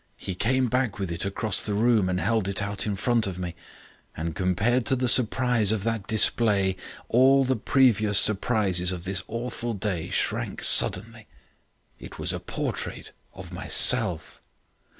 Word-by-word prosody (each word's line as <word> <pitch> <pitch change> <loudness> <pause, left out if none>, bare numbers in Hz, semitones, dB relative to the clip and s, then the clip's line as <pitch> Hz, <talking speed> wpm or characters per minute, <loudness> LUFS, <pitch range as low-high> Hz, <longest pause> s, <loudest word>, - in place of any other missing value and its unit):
He 95 - -6
came 130 +7 -1
back 125 -1 -2
with 95 -4 -5
it 85 +2 -4
across 100 +1 -2
the 105 - -3
room 110 -3 +1
and 90 0 -2
held 110 -2 -1
it 100 0 -3
out 100 +1 -3
in 105 - -2
front 115 +1 -1
of 90 -2 -6
me. 90 -2 -6 0.6
And 80 0 -5
compared 100 +7 0
to 130 - +2
the 125 0 -2
surprise 120 -3 +3
of 110 -3 -2
that 115 -3 -3
display, 105 -3 +3 0.3
all 135 +2 +3
the 130 0 0
previous 110 -4 +2
surprises 95 -4 +2
of 90 -2 -6
this 95 0 -2
awful 115 0 -5
day 95 -4 -4
shrank - - -3
suddenly. 110 +3 +2 0.7
"It - - -12
was - - +2
a - - -5
portrait - - -6 0.2
of - - -11
myself. - - +1
110 Hz, 160 wpm, -24 LUFS, 95-120 Hz, 0.7 s, surprise